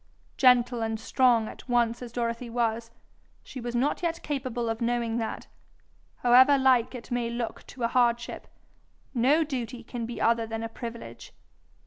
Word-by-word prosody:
Gentle 245 -2 +4
and 225 -1 -2
strong 235 -1 +3
at - - -11
once 235 -1 +1
as 245 -2 -7
Dorothy 235 0 -3
was, 230 -1 -1 0.5
she 255 - -8
was 240 0 -4
not 270 +9 0
yet 335 -1 -2
capable 255 -5 -3
of 225 +1 -3
knowing 235 -1 0
that, 225 - -4 0.8
however 260 +3 +7
like 260 -2 +3
it 240 -1 -10
may 240 -1 -1
look 235 -1 -5
to 250 - -8
a - - +3
hardship, 235 -1 0 0.7
no 275 +6 +3
duty 250 -5 -5
can 230 0 -5
be 240 - -6
other 230 0 +2
than 225 0 -4
a 225 - -4
privilege. 235 - -9
240 Hz, 160 wpm, -27 LUFS, 230-255 Hz, 0.8 s, however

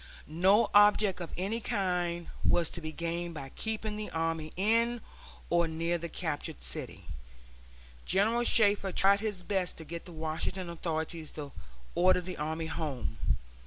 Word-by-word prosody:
No 190 +8 +4
object 205 -2 +5
of 170 - -5
any 200 +6 -1
kind 175 -4 -1 0.2
was 170 -2 +3
to 170 - -6
be 155 -1 -4
gained 170 +1 -3
by 135 -3 -6
keeping 215 +4 -3
the 215 - -4
army 165 -1 -2
in 230 +5 +2 0.5
or 170 -1 +4
near 165 +2 -1
the 170 +1 -5
captured 145 - -4
city. - - -4 1.0
General 220 +6 +2
Shafter 205 -4 +4
tried 195 +2 +5
his 205 -4 -3
best 190 -2 -1
to 160 - -9
get 170 +2 -6
the 180 - -10
Washington 165 +3 -3
authorities 160 -1 -3
to 145 -2 -6 0.4
order 180 +1 +5
the 180 0 -6
army 160 +2 -2
home. 150 -6 -3
175 Hz, 150 wpm, -31 LUFS, 160-200 Hz, 1.0 s, object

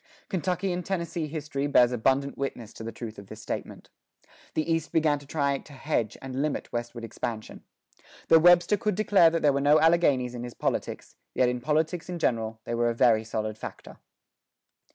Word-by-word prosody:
Kentucky 185 0 -1
and 180 0 -3
Tennessee 170 -3 -3
history 145 -2 -3
bears 125 -4 +5
abundant 135 +3 +1
witness 125 -5 -5
to - - -9
the 115 - -5
truth 110 -1 -8
of 100 - -12
this - - -10
statement. - - -6 0.6
The 155 - +1
East 165 -1 -1
began 155 -3 +2
to 145 - -16
try 140 -2 0
to 145 - -15
hedge 130 -5 -2
and 135 0 -3
limit 150 -1 -3
westward 120 0 -4
expansion. 110 0 -6 0.7
Though 165 - +7
Webster 175 +4 +5
could 210 -3 -1
declare 200 -5 +5
that 165 0 -2
there 145 -2 +4
were 140 - 0
no 145 +2 +5
Alleghanies 145 -7 +3
in 120 - -6
his 120 -1 -8
politics, - - -3 0.2
yet 125 -1 +3
in 125 0 -3
politics 160 +5 -1
in 175 - -3
general 115 -7 -1
they 120 - -4
were 120 0 +1
a 115 - -2
very 115 -2 +4
solid 110 -1 -4
factor. - - -9
140 Hz, 190 wpm, -27 LUFS, 120-165 Hz, 0.7 s, Though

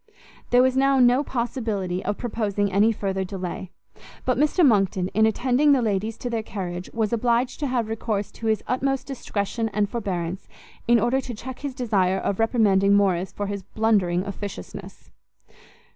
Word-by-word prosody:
There 245 +1 +5
was 260 0 +2
now 275 0 +3
no 250 +2 +5
possibility 225 -8 -2
of 205 +1 -2
proposing 210 -4 -1
any 205 +4 +4
further 195 -3 -2
delay; 185 -1 -5 0.6
but 255 - +2
Mr 300 +5 +3
Monckton, 195 -6 +2
in 220 +2 +3
attending 255 +6 +3
the 265 - +3
ladies 215 +1 -1
to 245 - -4
their 230 -1 -1
carriage, 180 -4 -5
was 220 -1 -1
obliged 240 +2 +1
to 290 - -1
have 245 -4 0
recourse 220 -2 -2
to 225 - -6
his 220 -1 +1
utmost 270 +1 0
discretion 225 -4 -3
and 210 0 0
forbearance, 190 -5 -4 0.4
in 235 0 +5
order 240 +5 +1
to 245 -3 -6
check 255 +4 -8
his 280 -3 -5
desire 195 -7 +1
of 195 +1 -2
reprimanding 200 -4 +3
Morrice 190 -2 +2
for 205 - -4
his 200 0 -4
blundering 195 -4 +1
officiousness. 200 - -8
220 Hz, 165 wpm, -24 LUFS, 195-245 Hz, 0.6 s, There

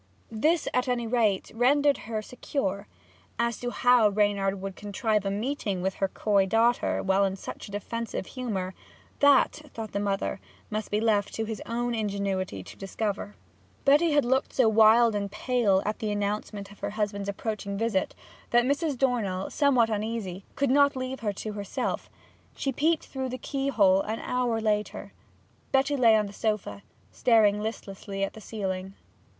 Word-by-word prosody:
This, 305 +9 +1
at 250 +1 +1
any 245 -2 0
rate, 220 -5 +1
rendered 280 +5 +3
her 215 -1 -2
secure. 205 -5 -3 0.5
As 235 -1 0
to 245 - -3
how 245 -3 +4
Reynard 200 -1 +1
would 195 0 -5
contrive 210 0 -1
a - - +1
meeting 205 -3 -2
with 190 0 0
her 195 - +3
coy 200 0 +1
daughter 230 +4 +2
while 195 +1 +3
in 195 -1 0
such 195 - -8
a - - -11
defensive 225 +1 -4
humour, 200 -8 -4 0.5
that, 285 +1 +4
thought 220 -2 -6
her 200 - 0
mother, 200 -1 -1 0.3
must 215 0 -3
be 210 - +1
left 215 -3 +1
to 225 - -2
his 220 -1 -5
own 240 +1 -1
ingenuity 200 - -2
to - - -12
discover. 205 +1 -3 0.5
Betty 295 +4 +5
had 290 -3 +3
looked 265 +2 +1
so 255 -4 +4
wild 220 +1 +6
and 200 -1 -2
pale 210 -4 +1
at 210 +1 -2
the 215 - -2
announcement 205 0 -3
of 205 - -15
her - - -3
husband's 200 -1 -2
approaching 200 -1 -4
visit, 220 -3 0 0.3
that 240 0 +4
Mrs. 285 +1 0
Dornell, 220 -8 0
somewhat 255 -6 +3
uneasy, 210 -3 -3
could 280 -2 +1
not 285 0 +4
leave 260 0 -4
her 210 -3 -2
to 215 +2 -5
herself. 205 -1 -3 0.5
She 275 - -1
peeped 315 +5 +1
through 265 -1 -4
the 255 - -4
keyhole 230 -10 +2
an 220 +2 -3
hour 245 -2 0
later. 210 -1 -2 0.6
Betty 275 +2 +2
lay 235 -5 +5
on 215 -1 +2
the 200 - -8
sofa, 205 - -2 0.3
staring 210 - +3
listlessly 195 -2 -5
at 195 - -2
the 220 - -11
ceiling. 190 -2 -4
215 Hz, 165 wpm, -27 LUFS, 200-245 Hz, 0.6 s, wild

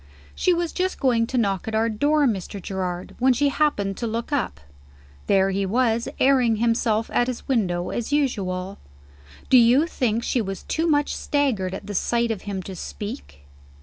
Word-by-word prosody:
"She 365 - +1
was 345 -1 0
just 370 +1 -1
going 235 -4 +2
to 255 - -2
knock 200 -5 0
at 220 - -2
our 225 +1 +2
door, 290 +7 +2
Mr. 200 -4 -2
Gerard, 180 -1 -4
when 260 +1 +4
she 285 +3 +2
happened 205 -10 0
to 235 - -3
look 230 +5 -4
up. 240 - -1 0.7
There 195 -1 +3
he 195 +1 -1
was, 230 +3 +1
airing 255 -4 +4
himself 230 -1 +1
at 245 - +2
his 250 -2 -5
window 180 -9 0
as 240 +3 -3
usual. 195 -10 -1 0.7
Do 255 - +8
you 245 +6 +5
think 235 -8 -1
she 245 - 0
was 195 -2 -5
too 325 +1 -1
much 290 -2 +1
staggered 225 -11 0
at 195 - -8
the 205 - -6
sight 235 +4 0
of 210 -4 -4
him 190 -2 -3
to 190 - -7
speak? 205 - -7
230 Hz, 180 wpm, -23 LUFS, 195-265 Hz, 0.7 s, Do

